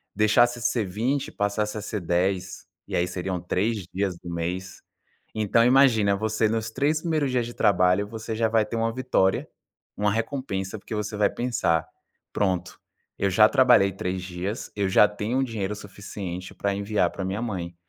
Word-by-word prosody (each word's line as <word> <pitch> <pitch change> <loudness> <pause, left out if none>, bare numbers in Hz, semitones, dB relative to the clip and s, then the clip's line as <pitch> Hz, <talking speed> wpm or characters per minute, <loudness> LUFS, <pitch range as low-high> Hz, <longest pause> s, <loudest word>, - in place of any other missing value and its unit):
deixasse 120 +3 +3
ser 115 -2 +1
20, 120 +9 -1
passasse 105 +1 -1
a - - -4
ser 105 -1 -4
10, 90 +2 -1 0.2
e - - -4
aí 90 - +1
seriam 90 0 -3
3 100 +2 -1
dias 95 -2 -1
do 85 - -10
mês. 90 +3 -4 0.5
Então 110 +2 +3
imagina, 120 -6 +5
você 110 +1 0
nos 110 0 -1
3 150 +5 +1
primeiros 155 -6 0
dias 125 -2 +1
de 120 - -8
trabalho, 90 +1 +3
você 110 +1 -5
já 115 0 +2
vai 110 -1 +3
ter 105 - -5
uma 115 0 0
vitória, 125 -6 +1 0.5
uma 105 0 +1
recompensa, 110 -4 -3
porque 110 - -9
você 105 0 -3
vai 105 -1 +4
pensar: 85 -10 0 0.5
"Pronto, 95 -2 -1 0.4
eu 100 - +2
já 105 +3 +6
trabalhei 125 -8 +5
3 95 0 -3
dias, 95 +5 -5
eu 100 -2 0
já 105 +2 +6
tenho 110 +6 -1
dinheiro 105 -5 -3
suficiente 95 -3 -7
pra 100 0 -1
enviar 100 -3 +1
pra 95 - -5
minha 100 +4 -3
mãe". 90 -7 -4
105 Hz, 170 wpm, -25 LUFS, 95-115 Hz, 0.5 s, já